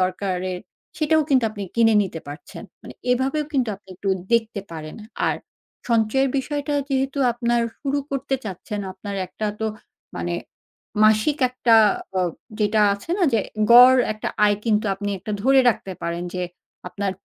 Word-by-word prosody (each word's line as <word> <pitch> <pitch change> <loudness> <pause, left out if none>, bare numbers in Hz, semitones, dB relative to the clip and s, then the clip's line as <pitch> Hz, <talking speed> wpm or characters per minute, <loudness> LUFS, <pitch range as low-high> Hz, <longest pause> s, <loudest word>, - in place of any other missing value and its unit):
দরকারের 185 -1 -1 0.4
সেটাও 310 0 +3
কিন্তু 260 -5 +3
আপনি 210 -1 -7
কিনে 225 -1 +4
নিতে 175 -4 -5
পারছেন। 145 +1 -9 0.2
মানে - - -10 0.2
এভাবেও 270 +4 +1
কিন্তু 260 -5 +1
আপনি 195 0 -31
একটু 195 +2 -5 0.2
দেখতে 225 -3 +1
পারেন। 155 -2 -8 0.3
আর - - 0 0.5
সঞ্চয়ের 235 +4 +2
বিষয়টা 290 +2 -2
যেহেতু 270 0 -1
আপনার 235 0 0 0.2
শুরু 280 0 -1
করতে 275 0 -1
চাচ্ছেন 205 +1 -5
আপনার 200 +1 -7
একটা 215 +4 -5
তো 220 - 0 0.5
মানে 85 0 -2 0.7
মাসিক 215 +7 +3
একটা 250 -2 +3 0.4
আ - - +2 0.4
যেটা 210 +1 +2
আছে 200 +11 -10
না - - 0
যে 225 - +3 0.3
গড় 250 +2 +9 0.2
একটা 215 - -4 0.2
আয় 205 -1 +3
কিন্তু 215 -2 +2
আপনি 205 +1 -4
একটা 215 +3 -6
ধরে 265 +2 +5
রাখতে 195 -4 -5
পারেন 170 +1 -3
যে 180 - -2 0.5
আপনার 200 +2 -2
220 Hz, 155 wpm, -22 LUFS, 195-265 Hz, 0.7 s, গড়